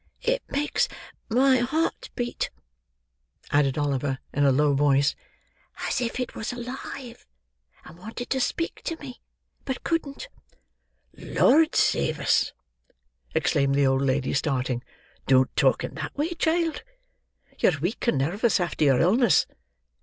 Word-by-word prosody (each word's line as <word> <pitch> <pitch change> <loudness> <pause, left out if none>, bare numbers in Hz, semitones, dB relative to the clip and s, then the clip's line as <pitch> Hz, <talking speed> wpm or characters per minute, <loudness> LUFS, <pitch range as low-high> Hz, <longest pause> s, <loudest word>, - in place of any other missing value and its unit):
It - - +1
makes 290 +2 0 0.4
my 260 +3 +4
heart 315 - -1
beat," 245 -1 -2 1.0
added 145 -2 +2
Oliver 140 -2 0 0.2
in 145 - +1
a 135 - +5
low 145 +2 +3
voice, 140 0 +3 0.7
"as - - 0
if 240 +1 -2
it 250 - -3
was 220 - -4
alive, 245 0 -7 0.6
and 165 +2 -13
wanted 225 +5 -7
to 265 - +1
speak 335 +6 -2
to 330 - -2
me, 260 -5 -10 0.4
but 265 -2 -4
couldn't." 330 - -2 0.9
"Lord 310 +4 +3
save 70 - +2
us!" - - +2 0.8
exclaimed 140 -1 +2
the 140 0 +3
old 135 0 +2
lady, 135 0 0
starting; 130 -3 -1 0.4
"don't 130 -1 +3
talk - - +3
in - - -5
that - - -6
way, 300 +3 0
child. 330 0 0 0.8
You're 165 - +3
weak 180 - -3
and 155 - +3
nervous 195 - +1
after 175 -3 -1
your 135 -3 +4
illness. 225 +8 +4
210 Hz, 135 wpm, -25 LUFS, -, 1.0 s, a